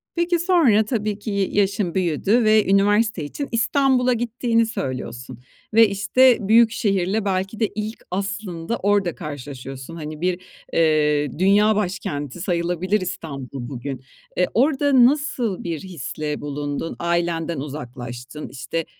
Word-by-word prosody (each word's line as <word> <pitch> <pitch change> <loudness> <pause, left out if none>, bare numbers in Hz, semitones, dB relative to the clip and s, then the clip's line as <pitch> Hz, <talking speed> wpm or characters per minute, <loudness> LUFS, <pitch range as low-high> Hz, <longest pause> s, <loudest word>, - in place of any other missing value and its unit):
Peki, 345 0 +1
sonra, 320 - +4
tabii 215 -3 -2
ki 210 +1 -5
y 200 -1 +1
yaşın 200 -3 0
büyüdü 190 +6 +2
ve 215 -1 +4
üniversite 205 -2 +3
için 280 - -5
İstanbul'a 250 +2 +2
gittiğini 235 0 +1
söylüyorsun 130 - -5 0.3
ve, 225 0 +7
işte, 230 +6 +4
büyük 225 +1 +6
şehirle 200 -2 0
belki 195 +2 -2
de 220 - +2
ilk 215 +1 -5
aslında 195 0 -3
orada 200 -3 +1
karşılaşıyorsun. 135 0 -8
Hani, 155 -1 -7
bir, 180 0 0 0.3
eee, 150 -3 +2
dünya 205 +3 +4
başkenti 175 -7 -3
sayılabilir 180 +3 0
İstanbul 135 -8 -6
bugün. 135 0 -6 0.3
Eee, 180 - +3
orada 270 -1 +4
nasıl 255 -7 0
bir 165 -3 -3
hisle 155 -4 -5
bulundun? 145 +2 -4
Ailenden 170 -2 -1
uzaklaştın, 125 -1 -7
işte, 135 +5 -4
185 Hz, 125 wpm, -22 LUFS, 150-220 Hz, 0.3 s, ve